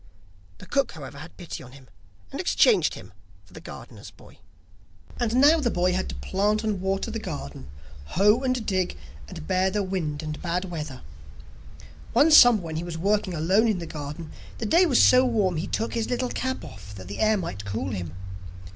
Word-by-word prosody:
The - - -12
cook, 275 +5 0
however, 140 -3 -9
had 160 +3 -11
pity 175 -3 -7
on 125 -1 -13
him, 135 -2 -15 0.4
and - - -3
exchanged - - +3
him 95 +3 -12 0.3
for - - -22
the - - -10
gardener's - - -10
boy. - - -18 0.8
And 240 -1 0
now 290 +5 +6
the 260 -6 +1
boy 180 -2 +1
had 185 +1 -2
to - - -5
plant 210 +3 0
and 210 -4 -1
water 195 +4 -1
the 225 - -3
garden, 70 - -7 0.4
hoe 205 - +3
and 255 -3 -1
dig, 185 - -1 0.3
and 75 - -9
bear 185 - +2
the 205 +1 -1
wind 165 -6 -3
and 155 -1 -5
bad 180 +2 -1
weather. 155 -7 -6 1.1
Once 300 +6 +5
in - - +12
summer 245 -5 +5
when 160 -1 -5
he 165 - -3
was 175 -2 -5
working 200 +1 0
alone 190 +8 +3
in 215 -4 +1
the 170 - -5
garden, 150 0 -7 0.3
the 225 - -4
day 340 - +4
was 260 -6 +3
so 255 0 +6
warm 210 -9 +1
he 160 - -3
took 225 - -2
his 230 -1 -2
little 250 0 -1
cap 260 +1 -3
off 105 - -11
that 95 -2 -10
the 100 - -7
air 215 0 +3
might 100 - -5
cool 100 -2 -3
him. 90 -4 -5
185 Hz, 200 wpm, -25 LUFS, 150-225 Hz, 1.1 s, in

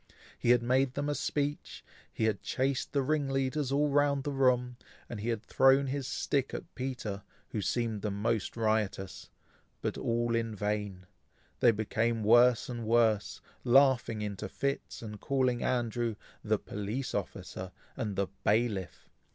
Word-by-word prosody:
He - - 0
had 120 -1 +5
made 130 +1 +2
them 145 +1 -1
a - - +1
speech, 145 0 -3 0.3
he - - -3
had 110 -3 +1
chased 135 0 -1
the 140 -2 +1
ring 145 0 0
leaders 135 +1 0
all 145 +2 +3
round 140 -1 +2
the 145 - -2
room, 125 -2 +2 0.3
and 115 - -6
he 110 +3 -3
had 115 -2 -2
thrown 135 +4 +4
his 135 0 -3
stick 135 0 -1
at - - -8
Peter, 125 -6 -4 0.3
who 105 - -3
seemed 115 0 -1
the 105 - -1
most 105 +2 -1
riotous, 110 -4 -1 0.5
but - - -3
all 120 0 0
in 115 -1 -1
vain; 105 -2 -3 0.5
they 120 - +6
became 110 +1 0
worse 120 +2 +5
and 120 -2 -5
worse, 110 -2 +2 0.2
laughing 125 -4 +4
into 100 -3 -4
fits, 140 -3 -3
and 105 -2 -7
calling 130 -3 +1
Andrew 120 -2 0 0.3
"the - - +2
police 105 +6 -4
officer," 95 0 -5 0.2
and 110 -6 -3
"the 100 - +1 0.2
bailiff." 105 -6 0
120 Hz, 155 wpm, -31 LUFS, 110-135 Hz, 0.5 s, they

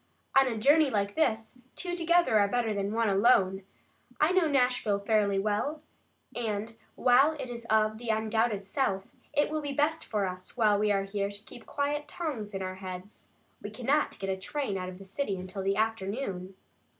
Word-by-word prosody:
"On 270 - +4
a 230 -3 -2
journey 290 +6 +5
like 200 -3 -1
this 225 -5 0 0.2
two 355 -1 -2
together 340 -8 +3
are 200 - +4
better 225 0 0
than 200 0 -2
one 225 +1 +1
alone. 195 -2 +3 0.6
I 305 +3 +4
know 370 -3 +3
Nashville 250 -7 +2
fairly 200 -1 +1
well, 215 +10 -1 0.5
and 225 -1 -3 0.2
while 265 +5 +5
it 260 -5 -6
is 235 -1 -7
of 215 0 +2
the 240 -1 -6
undoubted 220 -1 0
South, 195 -3 -1 0.3
it 290 +1 +1
will 310 0 -1
be 285 -1 -4
best 295 +3 +1
for 210 -3 -1
us, 185 +4 -7
while 210 -3 +4
we 210 0 +2
are 195 -1 +2
here, 200 0 -2
to 205 0 -10
keep 240 - -13
quiet 290 +1 -2
tongues 270 - -4
in 190 - -3
our 185 0 -5
heads. 185 +2 -8 0.3
We 205 - -6
cannot 255 +7 0
get 195 0 -3
a 190 - -2
train 255 +2 -3
out 185 -1 -3
of 185 - -9
the 195 - -12
city 200 0 -3
until 185 +2 -6
the 195 +1 +1
afternoon." 200 -3 -2
220 Hz, 190 wpm, -29 LUFS, 200-270 Hz, 0.6 s, journey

